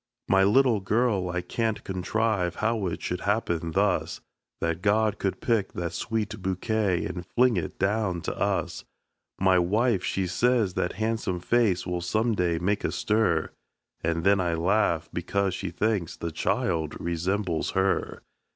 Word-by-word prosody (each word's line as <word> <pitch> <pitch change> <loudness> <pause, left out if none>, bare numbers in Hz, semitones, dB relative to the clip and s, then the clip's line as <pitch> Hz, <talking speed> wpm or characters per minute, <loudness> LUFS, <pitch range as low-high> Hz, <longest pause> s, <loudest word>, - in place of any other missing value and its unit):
My 95 0 +4
little 115 +2 +4
girl 100 -2 +1
I 90 0 -2
can't 110 +4 -2
contrive 95 -1 -1
how 110 -3 0
it 85 - -4
should 90 +1 -3
happen 85 -6 -1
thus 100 +1 +1 0.4
That 85 +1 -1
God 105 +1 +2
could 95 - -2
pick 110 -5 0
that 85 -2 -3
sweet 110 -1 -3
bouquet, 95 0 0
and 90 - -5
fling 120 +6 +2
it 90 - -3
down 95 -3 0
to - - -4
us! - - -1 0.6
My 95 -1 +4
wife, 105 +3 +1
she 95 - -1
says 110 +2 +2
that 90 - -1
han'some 110 -4 -1
face 100 -2 +2
will 90 -1 -2
some 110 +6 +1
day 90 -4 +1
make 100 +5 0
a - - 0
stir; 105 -7 +1 0.5
And 85 0 0
then 100 +1 +4
I 85 -2 0
laugh, 85 -2 +1
because 95 +2 -1
she 95 0 -4
thinks 100 -1 -1
the 85 - -4
child 80 0 -1
resembles 85 +1 -1
her. 95 0 0
95 Hz, 155 wpm, -26 LUFS, 90-110 Hz, 0.6 s, My